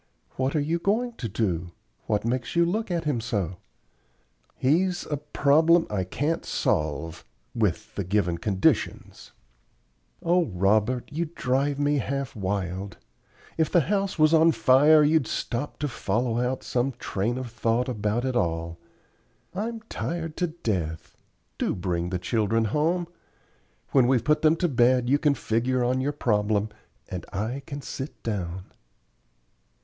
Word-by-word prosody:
"What 130 +3 -1
are - - +3
you 165 +4 0
going 225 +7 0
to 115 - -4
do? 90 -4 -2 0.3
What 105 0 0
makes 125 +3 -2
you 170 0 +5
look 215 +6 -1
at 170 -2 -1
him 145 -7 0
so?" 100 -7 -2 1.0
"He's 175 +7 +1
a 150 - +1
problem 155 +3 +3
I 95 -3 -1
can't 145 - -1
solve 80 +1 -1 0.3
with - - -1
the 100 - -3
given 90 -2 0
conditions." 95 -3 0 0.9
"O 175 +1 +3
Robert, 105 +6 +1
you 165 +3 -1
drive 135 +3 0
me 145 0 +2
half 140 0 -3
wild. 95 -1 -3 0.6
If 160 - +2
the 175 - +5
house 195 +3 -1
was 155 0 +4
on 160 0 +6
fire 145 +4 +6
you'd 150 -4 +3
stop 125 +5 -3
to 150 - -2
follow 120 -1 -1
out 125 +1 -1
some 130 +2 0
train 115 0 -2
of 130 -3 -5
thought 115 +1 0
about 110 0 -1
it 130 -1 -1
all. 85 -5 -1 0.7
I'm 225 +4 -3
tired 165 -7 -4
to 180 - +1
death. 95 - -3 0.4
Do - - 0
bring 90 -1 -2
the 90 - -1
children 110 +4 +1
home. 165 - 0 0.8
When 130 -3 +5
we've 125 -3 +3
put 150 0 +3
them 155 0 +5
to 175 +1 +1
bed 125 -2 +3
you 145 - +4
can 150 -3 +3
figure 125 +2 0
on 130 +2 +1
your 140 +2 0
problem, 105 -6 +1 0.4
and 90 -1 -5
I 110 +7 -3
can 140 0 -6
sit 135 +3 -7
down." 95 -4 -4
125 Hz, 150 wpm, -26 LUFS, 105-155 Hz, 1.0 s, on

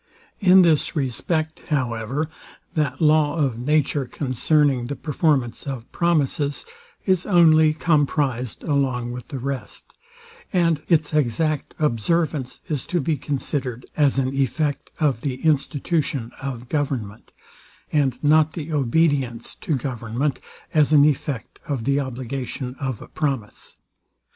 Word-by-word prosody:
In 190 -2 +7
this 160 -2 +2
respect, 155 +4 -1
however, 130 +1 -1 0.5
that 145 -3 -1
law 155 -1 +4
of 135 -7 0
nature, 145 +1 +1
concerning 135 0 +1
the 145 - -3
performance 145 -6 0
of 130 -4 -6
promises, 150 -4 0 0.4
is 185 -3 +1
only 160 -4 +5
comprized 145 -6 0
along 130 -5 0
with 125 0 -7
the 140 - -5
rest; 135 +1 -5 0.6
and 170 -5 +2
its 155 -3 +2
exact 150 +2 0
observance 150 +1 0
is 150 -5 -2
to 175 - 0
be 155 +1 0
considered 130 -3 -3
as 145 -3 +3
an 130 -1 +1
effect 140 +2 -1
of 140 -7 +1
the 135 -3 -2
institution 145 -3 0
of 130 -3 -5
government, 125 -8 -3 0.6
and 135 -3 +1
not 155 +1 +4
the 160 -1 -5
obedience 135 -3 +1
to 155 - -2
government 125 +1 -2 0.3
as 155 -2 +4
an 145 -1 +7
effect 140 -5 -2
of 135 -6 -2
the 140 +3 +2
obligation 130 -1 -4
of 130 -5 -3
a - - -13
promise. 135 -9 -3
140 Hz, 125 wpm, -23 LUFS, 130-155 Hz, 0.6 s, In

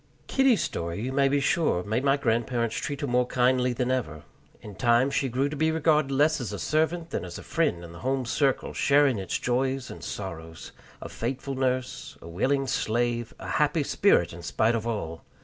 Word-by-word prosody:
Kitty's 265 -5 +3
story, 85 +2 -3
you 125 +4 -3
may 140 +1 +3
be 140 +1 +2
sure, 140 - +1
made 110 +6 -1
my 140 0 +3
grandparents 115 -2 0
treat 140 -1 -4
her - - 0
more 125 -1 +1
kindly 125 0 +2
than 125 +1 -1
ever. 80 -13 -2 0.4
In 105 - -10
time 120 +5 +3
she 135 - 0
grew 130 +4 0
to 145 - -5
be 160 +2 +1
regarded 155 -2 +2
less 150 +2 +2
as 115 -5 -4
a 100 - -4
servant 160 - 0
than - - -2
as - - -7
a - - -9
friend 150 - 0
in 85 - -10
the 85 - -11
home 130 0 -1
circle, 135 +3 0
sharing 140 -5 +3
its 95 - -2
joys 130 +1 -1
and - - -10
sorrows 80 -4 -7 0.3
a - - -7
faithful 135 +3 -4
nurse, 130 -1 -2
a - - -12
willing 135 +11 0
slave, 120 -1 -1
a - - -9
happy 150 +1 +1
spirit 135 - +2
in 85 - -9
spite 110 +6 +1
of 115 0 -2
all. 85 -8 -4
125 Hz, 200 wpm, -27 LUFS, 115-140 Hz, 0.4 s, Kitty's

